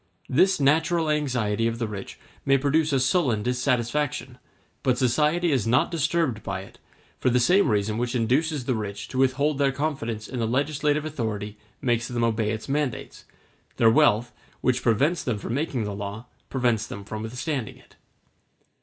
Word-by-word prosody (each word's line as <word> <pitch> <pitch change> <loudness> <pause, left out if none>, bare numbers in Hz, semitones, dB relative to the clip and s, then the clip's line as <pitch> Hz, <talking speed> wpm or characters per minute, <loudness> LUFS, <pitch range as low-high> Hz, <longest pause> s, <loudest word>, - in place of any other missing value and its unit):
This 185 +7 +3
natural 160 +3 +2
anxiety 120 -7 0
of 115 0 -2
the 115 -2 -2
rich 100 -2 -7 0.3
may 135 0 +4
produce 150 +3 +1
a 135 - +2
sullen 130 - +1
dissatisfaction, 125 +1 -1 0.4
but 130 -2 +1
society 150 +7 +2
is 125 -6 +1
not 125 +8 +3
disturbed 160 -7 0
by - - -4
it; - - -14 0.4
for - - +2
the 125 0 +3
same 180 +7 +4
reason 105 +1 0
which 120 +1 -1
induces 130 +4 +1
the 130 - +1
rich 105 -3 -4
to 130 - -3
withhold 135 +2 +2
their 140 -1 +3
confidence 125 -7 -3
in 130 - -5
the 115 - 0
legislative 145 +4 0
authority 110 -8 -4 0.3
makes 120 -2 +1
them 120 -1 -2
obey 110 -2 +1
its 110 0 -4
mandates; 140 -2 -3 0.5
their 115 -1 +5
wealth, 120 -4 +3 0.3
which 125 0 +1
prevents 140 +9 +2
them 125 -5 -1
from 105 - -5
making 135 -4 -1
the 105 -1 -3
law, 100 +3 -6 0.2
prevents 120 -5 0
them 100 - -7
from 105 +1 -6
withstanding 125 +2 -4
it. - - -22
125 Hz, 170 wpm, -25 LUFS, 115-150 Hz, 0.5 s, their